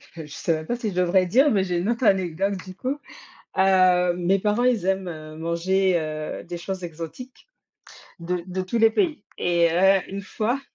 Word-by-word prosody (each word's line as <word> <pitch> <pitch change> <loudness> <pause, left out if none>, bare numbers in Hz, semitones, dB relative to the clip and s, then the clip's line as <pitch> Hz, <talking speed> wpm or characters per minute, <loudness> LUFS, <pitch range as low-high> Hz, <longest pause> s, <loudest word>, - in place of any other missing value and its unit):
je 160 -2 -7
sais 165 - -1
même 155 0 -4
pas 240 - -2
si 220 -4 -3
je - - -9
devrais 180 +1 +3
dire, 265 +11 +4
mais 195 -3 +2
j'ai 175 -1 -1
une 180 +5 -1
autre 235 +1 0
anecdote 195 0 +1
du 185 - -9
coup. 260 +8 -3 0.6
Heu, 185 -2 +4
mes 180 +2 +1
parents, 210 +4 +1
ils 240 -7 +2
aiment, 190 -1 0
heu, 155 -1 -8
manger, 175 +3 +1
heu, 155 -1 -5
des 175 0 -6
choses 185 0 -5
exotiques 170 - -9 0.7
de 175 0 -3
de 185 0 -3
tous 185 +5 -2
les 225 0 +6
pays 310 - 0
et 170 -1 +2
heu, 190 +3 +5
une 200 +1 -5
fois 235 +7 -2
185 Hz, 195 wpm, -24 LUFS, 175-205 Hz, 0.7 s, les